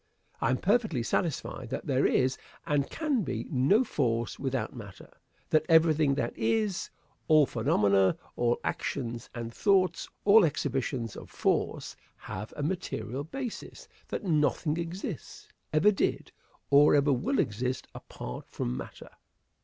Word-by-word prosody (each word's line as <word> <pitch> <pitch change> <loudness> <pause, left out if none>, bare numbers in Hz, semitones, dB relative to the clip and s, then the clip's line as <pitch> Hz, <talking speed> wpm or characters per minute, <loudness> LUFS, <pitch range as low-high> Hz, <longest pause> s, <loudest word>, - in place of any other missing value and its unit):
I 115 - +2
am 130 - +2
perfectly 205 - +1
satisfied 135 -4 -2
that - - -4
there 135 -1 +2
is, 130 0 +2 0.3
and 145 -4 0
can 300 -7 0
be, 125 - -3
no 145 - +4
force 120 - -1
without 135 -1 -2
matter; 105 -5 -11 0.4
that 155 - +4
everything 160 -3 +4
that 140 - -2
is 215 -5 0 0.4
all 155 -2 +6
phenomena 100 -5 +2 0.2
all 120 0 +1
actions 120 -4 -3
and 115 -1 -5
thoughts, 190 - +2 0.2
all 210 +1 +7
exhibitions 130 -6 -1
of - - -10
force, - - -1 0.2
have 105 +4 -7
a 145 - -3
material 140 - -3
basis 245 - -7 0.2
that - - -4
nothing 155 -2 +1
exists, 170 +3 -6 0.2
ever 155 +7 +5
did, 195 - -1 0.4
or 145 +1 +7
ever 145 0 +4
will 135 - 0
exist, 125 +4 -1
apart - - -8
from - - -3
matter. 65 - -8
140 Hz, 135 wpm, -29 LUFS, 120-170 Hz, 0.4 s, all